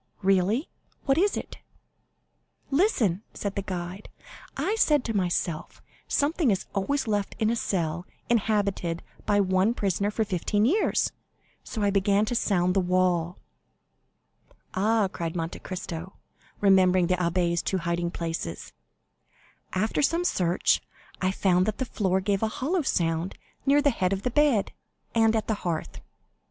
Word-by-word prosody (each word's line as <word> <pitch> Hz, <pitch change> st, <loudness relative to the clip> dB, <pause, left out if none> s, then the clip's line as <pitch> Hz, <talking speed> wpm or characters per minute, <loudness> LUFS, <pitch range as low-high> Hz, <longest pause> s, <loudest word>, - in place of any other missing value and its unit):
"Really? 195 Hz, -, +2 dB, 0.4 s
What 275 Hz, +2 st, +3 dB
is 405 Hz, +2 st, +2 dB
it?" -, -, -7 dB, 1.1 s
"Listen," 260 Hz, -, +2 dB
said 200 Hz, -1 st, -3 dB
the 200 Hz, -, -2 dB
guide; 185 Hz, +1 st, -6 dB, 0.5 s
"I 415 Hz, -, 0 dB
said 300 Hz, -, +3 dB
to 225 Hz, -, -2 dB
myself, 175 Hz, -4 st, -1 dB, 0.3 s
'Something 295 Hz, 0 st, +1 dB
is 195 Hz, -3 st, 0 dB
always 250 Hz, +7 st, 0 dB
left 205 Hz, -2 st, -1 dB
in 220 Hz, -1 st, +1 dB
a -, -, +1 dB
cell 175 Hz, -5 st, -2 dB, 0.2 s
inhabited 200 Hz, -6 st, 0 dB, 0.2 s
by 205 Hz, 0 st, +3 dB
one 190 Hz, +3 st, +2 dB
prisoner 200 Hz, -1 st, 0 dB
for 220 Hz, +1 st, -1 dB
fifteen 205 Hz, +2 st, 0 dB
years,' 380 Hz, -, +2 dB, 0.5 s
so 220 Hz, -, -4 dB
I 200 Hz, -, +3 dB
began 200 Hz, +1 st, +3 dB
to 230 Hz, -, -2 dB
sound 180 Hz, -6 st, +2 dB
the 195 Hz, -, +3 dB
wall." 180 Hz, -1 st, +1 dB, 1.4 s
"Ah," 215 Hz, +1 st, +2 dB
cried 170 Hz, -2 st, -5 dB
Monte 165 Hz, 0 st, -3 dB
Cristo, 180 Hz, -1 st, -6 dB, 0.5 s
remembering 185 Hz, -2 st, +5 dB
the 180 Hz, +1 st, +2 dB
abbé's 170 Hz, -1 st, +1 dB
two 190 Hz, -, -1 dB
hiding 170 Hz, 0 st, -1 dB
places. 165 Hz, -, -5 dB, 1.0 s
"After 215 Hz, +8 st, 0 dB
some 335 Hz, +4 st, +2 dB
search, 180 Hz, -, +2 dB, 0.4 s
I 185 Hz, -, +2 dB
found 185 Hz, -1 st, +2 dB
that 215 Hz, -, -1 dB
the 260 Hz, -, -1 dB
floor 190 Hz, -5 st, 0 dB
gave 195 Hz, 0 st, 0 dB
a 220 Hz, -, +2 dB
hollow 305 Hz, +11 st, -1 dB
sound 170 Hz, -, -1 dB, 0.3 s
near 285 Hz, +1 st, +5 dB
the 285 Hz, -, +4 dB
head 190 Hz, -5 st, 0 dB
of 195 Hz, 0 st, -3 dB
the 250 Hz, -, 0 dB
bed, 280 Hz, -7 st, +2 dB, 0.4 s
and 225 Hz, -1 st, +4 dB
at 220 Hz, -, 0 dB
the 215 Hz, -2 st, -2 dB
hearth." 165 Hz, -3 st, -3 dB
195 Hz, 145 wpm, -27 LUFS, 180-225 Hz, 1.4 s, remembering